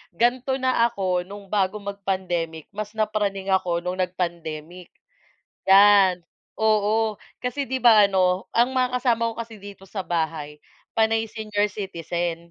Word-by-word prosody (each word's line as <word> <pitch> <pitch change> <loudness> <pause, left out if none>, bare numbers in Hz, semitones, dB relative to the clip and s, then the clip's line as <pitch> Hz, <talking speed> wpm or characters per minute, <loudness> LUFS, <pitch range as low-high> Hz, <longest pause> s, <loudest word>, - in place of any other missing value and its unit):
ganito 255 +4 +1
na 255 -3 +2
ako 185 -4 -1
no'ng 200 0 -10
bago 200 0 +1
mag-pandemic, 185 -5 -3
mas 215 +1 -6
napraning 200 -3 -1
ako 175 -2 0
no'ng 180 +1 -3
nag-pandemic. 175 -1 -4 0.8
Yan, 195 -3 +6 0.3
oo, 215 0 +1 0.2
kasi 270 +2 -3
'di 260 - 0
ba 220 -5 +6
ano, 185 -1 +1
ang 245 +3 +3
mga 250 -1 +1
kasama 230 -2 +1
ko - - -6
kasi 230 -1 -6
dito 200 -1 -11
sa 195 0 -5
bahay 160 -4 -3 0.4
panay 225 0 +2
senior 210 -1 -2
citizen. 175 -4 -3
200 Hz, 135 wpm, -24 LUFS, 180-225 Hz, 0.8 s, Yan